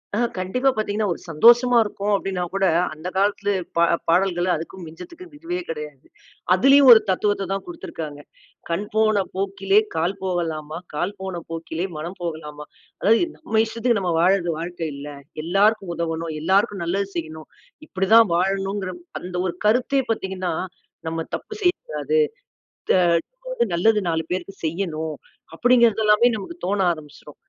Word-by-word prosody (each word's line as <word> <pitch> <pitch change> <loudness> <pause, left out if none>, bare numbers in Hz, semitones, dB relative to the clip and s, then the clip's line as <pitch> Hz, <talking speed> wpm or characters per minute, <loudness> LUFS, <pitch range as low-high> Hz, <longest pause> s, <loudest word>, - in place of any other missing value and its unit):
ஆ - - 0 0.2
கண்டிப்பா 250 +9 +1
பார்த்தீங்கன்னா, 215 -1 -1
ஒரு - - -11
சந்தோஷமா 240 +9 +6
இருக்கோம் 205 0 -3
அப்பிடீனா 190 -2 -2
கூட, 195 0 +1 0.3
அந்த 155 +4 -8
காலத்தில 205 +1 +1 0.3
பா 170 - +5 0.3
பாடல்கள, 175 0 +2
அதுக்கும் 170 +3 -8
மிஞ்சறதுக்கும் 340 - -12
இதுவே 350 +3 -4
கிடையாது. 150 -3 -7 0.5
அதிலயும் 275 +6 +6
ஒரு 225 - +10
தத்துவத்த 195 0 0
தான் 195 - -3
குடுத்திருக்காங்க. 155 - -7 0.5
"கண் 180 +5 -1
போன 215 -2 +3
போக்கிலே, 195 +1 +2 0.2
கால் 175 +4 0
போகலாமா? 160 -4 -3 0.2
கால் 185 +6 -2
போன 185 -3 -4
போக்கிலே, 165 +2 -4
மனம் 170 +5 -6
போகலாமா?" 150 -3 -6 0.4
அதாவது, 225 - +4
நம்ம 220 -8 +1
இஷ்டத்துக்கு, 230 0 0
நம்ம 175 -2 0
வாழ்றது 180 -1 +3
வாழ்க்கை 170 -1 -4
இல்ல. 140 +1 -8 0.4
எல்லோருக்கும் 195 +1 +2
உதவணும். 165 -1 -3
எல்லோருக்கும் 195 +1 +1
நல்லது 195 +3 -1
செய்யணும். 160 -1 -6 0.4
இப்பிடி 190 +1 -2
தான் 225 -4 +7
வாழணுங்கிற 195 +1 -1 0.3
அந்த 180 0 -7
ஒரு 175 - -4
கருத்தே 250 +4 +2
பார்த்தீங்கன்னா, 190 -4 -2 0.5
நம்ம 165 0 -2
தப்பு 430 - -8
செய்யக்கூடாது. 465 +5 0 0.7
த - - +6 0.8
நல்லது, 215 +5 +3
4 160 0 0
பேருக்கு 185 +2 -4
செய்யணும் 160 -2 -3 0.4
அப்பிடீங்கிறதெல்லாமே 235 -1 +4
நமக்கு 335 - -8
தோண 200 +1 0
ஆரம்பிச்சிரும். 150 -1 -13
190 Hz, 135 wpm, -22 LUFS, 165-215 Hz, 0.8 s, ஒரு